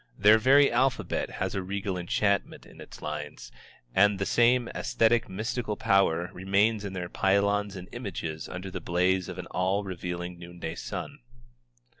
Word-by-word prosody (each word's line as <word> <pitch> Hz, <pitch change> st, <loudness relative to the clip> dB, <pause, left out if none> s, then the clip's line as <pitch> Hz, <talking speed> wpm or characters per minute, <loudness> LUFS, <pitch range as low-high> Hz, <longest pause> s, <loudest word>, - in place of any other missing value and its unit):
Their 105 Hz, +2 st, +6 dB
very 140 Hz, +5 st, +5 dB
alphabet 130 Hz, +2 st, 0 dB
has -, -, -3 dB
a 95 Hz, -, -1 dB
regal 95 Hz, +1 st, -3 dB
enchantment 100 Hz, +3 st, -1 dB
in -, -, -14 dB
its -, -, -12 dB
lines, 75 Hz, -1 st, -6 dB, 0.4 s
and 100 Hz, +1 st, +4 dB
the 100 Hz, -, -1 dB
same 120 Hz, +2 st, +3 dB
æsthetic 115 Hz, 0 st, +1 dB
mystical 110 Hz, +2 st, -3 dB
power 90 Hz, -3 st, +2 dB
remains 100 Hz, +3 st, +1 dB
in 100 Hz, -2 st, -5 dB
their 90 Hz, -2 st, -4 dB
pylons 100 Hz, +2 st, +1 dB
and 90 Hz, -1 st, -8 dB
images 80 Hz, -1 st, -5 dB
under 95 Hz, +1 st, -6 dB
the 95 Hz, -, -5 dB
blaze 90 Hz, +2 st, +1 dB
of 90 Hz, -, -6 dB
the 90 Hz, -, -6 dB
all 95 Hz, +3 st, 0 dB
revealing 90 Hz, -2 st, -5 dB
noonday 85 Hz, -1 st, -7 dB
sun. -, -, -6 dB
95 Hz, 155 wpm, -28 LUFS, 90-105 Hz, 0.4 s, Their